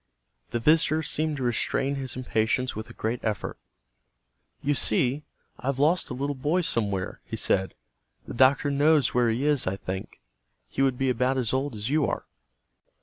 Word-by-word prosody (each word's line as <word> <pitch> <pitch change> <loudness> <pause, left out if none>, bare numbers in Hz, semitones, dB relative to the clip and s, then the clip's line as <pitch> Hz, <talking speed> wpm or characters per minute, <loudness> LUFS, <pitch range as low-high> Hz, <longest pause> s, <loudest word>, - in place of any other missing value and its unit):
The 120 - -1
visitor 155 +4 +3
seemed 155 +1 0
to 135 - -3
restrain 125 +3 0
his 135 -2 -4
impatience 125 0 0
with 110 +1 -6
a - - -10
great 115 +2 -2
effort. 110 -2 -3 1.0
"You 145 - +2
see, 130 +3 +1 0.3
I've 130 +2 -2
lost 160 +5 +2
a 125 - -4
little 140 +3 -2
boy 150 +7 0
somewhere," 105 - -1
he - - -6
said. 95 -1 0 0.5
"The - - -6
doctor 135 +3 +4
knows 145 -1 +3
where 120 -1 +3
he 120 +5 0
is, 150 -7 +2
I 95 - 0
think. 95 0 -6 0.5
He - - -3
would 135 -2 +2
be 135 0 +1
about 125 +2 +1
as 125 -3 -1
old 135 -1 -1
as 105 +5 -3
you 150 -1 +2
are." - - -3
130 Hz, 175 wpm, -26 LUFS, 115-145 Hz, 1.0 s, doctor